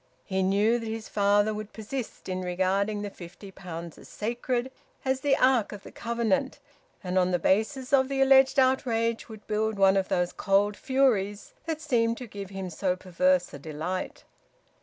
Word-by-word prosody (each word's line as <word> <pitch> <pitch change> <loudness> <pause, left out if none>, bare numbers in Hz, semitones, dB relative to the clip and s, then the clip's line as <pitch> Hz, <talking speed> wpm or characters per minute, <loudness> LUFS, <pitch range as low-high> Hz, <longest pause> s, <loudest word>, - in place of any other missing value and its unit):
He 190 -1 -1
knew 205 +5 +2
that 230 - -6
his 225 0 -5
father 205 +1 +2
would 215 0 -7
persist 230 +3 -6
in 185 0 -3
regarding 190 +3 0
the 205 - -5
fifty 180 +3 -11
pounds 170 -3 -8
as - - -14
sacred, 240 +3 -2 0.3
as 265 0 +1
the 275 0 +2
ark 255 -4 +3
of 205 -1 -9
the - - -11
covenant, 235 +4 -1 0.5
and 185 0 +1
on 180 0 +2
the 180 - +2
basis 250 +9 0
of 265 -1 +4
the 275 -1 -2
alleged 270 0 +5
outrage 235 -4 +1
would 220 -1 -11
build 215 0 -1
one 195 0 +5
of 190 - 0
those 180 0 0
cold 205 +1 +2
furies 220 -7 0
that 320 -1 -3
seemed 230 -6 +1
to 250 - -7
give 200 -3 -8
him 190 -2 -6
so 180 +2 0
perverse 185 0 +1
a 140 - -8
delight. 160 +5 -5
210 Hz, 180 wpm, -27 LUFS, 190-240 Hz, 0.5 s, alleged